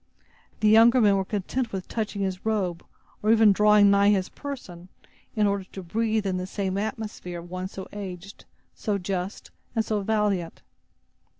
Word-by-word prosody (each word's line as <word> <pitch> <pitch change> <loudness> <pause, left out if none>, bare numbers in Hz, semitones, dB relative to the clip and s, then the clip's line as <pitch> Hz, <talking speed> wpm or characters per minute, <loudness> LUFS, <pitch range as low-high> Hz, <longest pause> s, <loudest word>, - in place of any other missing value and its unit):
The 215 - +4
younger 230 +4 +7
men 205 -4 +5
were 195 - +1
content 220 +5 -3
with 190 -2 -5
touching 215 -3 -3
his 190 -1 -3
robe, 195 -6 -1 0.4
or 215 - +3
even 220 -2 +6
drawing 210 0 +5
nigh 200 0 +5
his 190 -3 +1
person, 185 -11 -8 0.5
in 215 -2 +3
order 200 -1 0
to 190 0 -9
breathe 220 +3 -1
in 185 -1 0
the 190 +1 -3
atmosphere 210 -5 -5
of 170 +1 -10
one 185 0 -4
so 190 0 -8
aged, 195 -1 -8 0.3
so 210 -3 -2
just, 185 +1 -4 0.2
and 225 -1 +1
so 210 -2 -1
valiant. 200 -4 -1
200 Hz, 165 wpm, -26 LUFS, 185-215 Hz, 0.5 s, younger